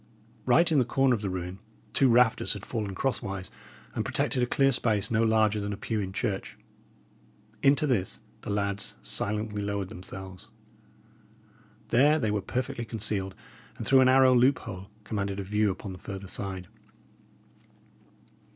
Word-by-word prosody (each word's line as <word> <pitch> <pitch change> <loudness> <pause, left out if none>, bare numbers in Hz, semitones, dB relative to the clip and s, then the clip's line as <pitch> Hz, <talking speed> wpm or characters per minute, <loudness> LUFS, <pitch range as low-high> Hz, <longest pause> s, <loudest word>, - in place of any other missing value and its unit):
Right 170 0 +5
in 150 - +4
the - - +4
corner 130 +2 +2
of 110 - -1
the 100 - -2
ruin, 90 +1 -5 0.3
two 135 - +4
rafters 120 -1 +4
had 105 -1 -8
fallen 105 -5 -3
crosswise, 100 -6 -2 0.4
and - - -1
protected 125 - 0
a 125 - +2
clear 135 +2 +3
space 110 -6 +1
no 110 0 +2
larger 110 -1 +3
than 100 0 -3
a - - -6
pew 110 +1 -2
in 95 -2 -3
church. 100 0 -3 1.0
Into 140 +2 +5
this 110 -10 0 0.2
the - - -7
lads 100 -1 -1
silently 105 0 -2
lowered 100 -2 -2
themselves. 95 +1 -9 1.4
There 145 +6 +5
they 110 -8 0
were 105 -1 0
perfectly 125 +4 -3
concealed, 105 -4 -3 0.4
and 115 - -5
through 135 +2 +6
an 130 - +5
arrow 130 0 +6
loophole 120 -7 +1
commanded 100 -2 -3
a - - -3
view 105 +2 +1
upon 95 +1 -5
the 90 - -9
farther 95 +1 -7
side. 95 -1 -4
105 Hz, 155 wpm, -28 LUFS, 100-125 Hz, 1.4 s, through